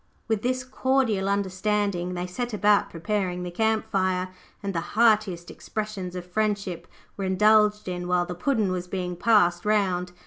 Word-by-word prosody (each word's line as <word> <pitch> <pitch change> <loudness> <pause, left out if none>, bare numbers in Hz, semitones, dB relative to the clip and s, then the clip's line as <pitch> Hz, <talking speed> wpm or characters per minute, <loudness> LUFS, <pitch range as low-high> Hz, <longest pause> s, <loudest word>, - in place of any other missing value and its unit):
With 220 -3 0
this 255 +2 -1
cordial 255 -6 0
understanding 200 -2 -1
they 175 0 -3
set 240 +5 -4
about 205 -1 +3
preparing 180 0 -2
the 180 - -5
camp 220 +4 +1
fire, 185 -1 0 0.3
and 200 -1 -2
the 170 - 0 0.2
heartiest 215 -7 +3
expressions 210 -4 -5
of 180 -1 -5
friendship 200 -3 -2 0.3
were 195 - -2
indulged 210 +2 +3
in 180 -1 -4
while 180 0 +2
the 180 - -5
Puddin' 210 +1 0
was 180 -1 -3
being 180 -1 -3
passed 175 -3 +3
round. 190 -4 +1
195 Hz, 160 wpm, -25 LUFS, 180-215 Hz, 0.3 s, about